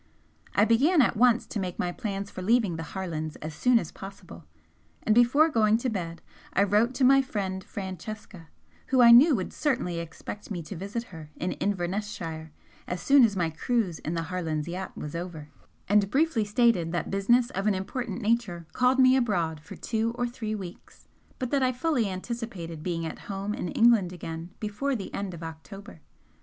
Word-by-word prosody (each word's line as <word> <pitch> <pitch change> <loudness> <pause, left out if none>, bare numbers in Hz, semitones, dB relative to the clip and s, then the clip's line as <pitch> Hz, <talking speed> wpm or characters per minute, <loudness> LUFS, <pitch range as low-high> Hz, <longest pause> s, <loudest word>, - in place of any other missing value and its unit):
I 205 - +5
began 275 - +4
at 235 - +1
once 240 +1 +4
to 215 - -4
make 185 -2 -4
my 175 - -1
plans 200 +1 -4
for 185 - -7
leaving 215 -2 +2
the 165 - -5 0.2
Harlands 160 -5 -4
as 155 0 -7
soon 245 +10 +3
as 170 - -2
possible, 190 - -11 0.6
and 215 - +3
before 240 +7 +5
going 220 -5 +3
to 245 +1 -2
bed 170 -5 -5 0.3
I 195 - +4
wrote 210 +5 +2
to 270 - 0
my 270 +1 +7
friend 190 -7 -3
Francesca, 190 -2 -7 0.4
who 265 - +2
I 235 - +9
knew 270 +6 +8
would 185 -5 -4
certainly 205 - -1
expect 170 +5 -8
me 175 -5 -4
to 195 - -8
visit 200 +7 -4
her 160 -2 -9
in 180 - -2
Inverness 200 +1 -2
shire 160 -5 -6 0.4
as 180 - -3
soon 275 +9 +6
as 215 -4 +3
my 170 -3 0
cruise 190 0 -1
in 160 - -4
the 165 - -1
Harlands' 165 -3 -3
yacht 185 +2 -6
was 150 - -6
over, 165 -3 -6 0.4
and 205 0 +3
briefly 275 -4 +2
stated 210 -6 +2
that 175 - -2
business 235 +6 +3
of 195 +2 -2
an 205 - +3
important 240 +5 -4
nature 210 -7 0
called 255 +1 +3
me 260 0 +6
abroad 175 -11 0
for 155 - -11
two 230 0 -2
or 245 - 0
three 230 -3 -4
weeks, 185 -3 -10 0.3
but 255 -2 -4
that 280 - +2
I 255 -1 +3
fully 250 -4 0
anticipated 185 -5 -5
being 165 -1 -2
at 160 - -6
home 200 +1 -3
in 180 - -4
England 225 -6 +4
again 165 -1 -7
before 225 +6 -2
the 200 - -6
end 195 -3 -4
of 165 - -9
October. 165 +3 -10
200 Hz, 190 wpm, -27 LUFS, 175-235 Hz, 0.6 s, I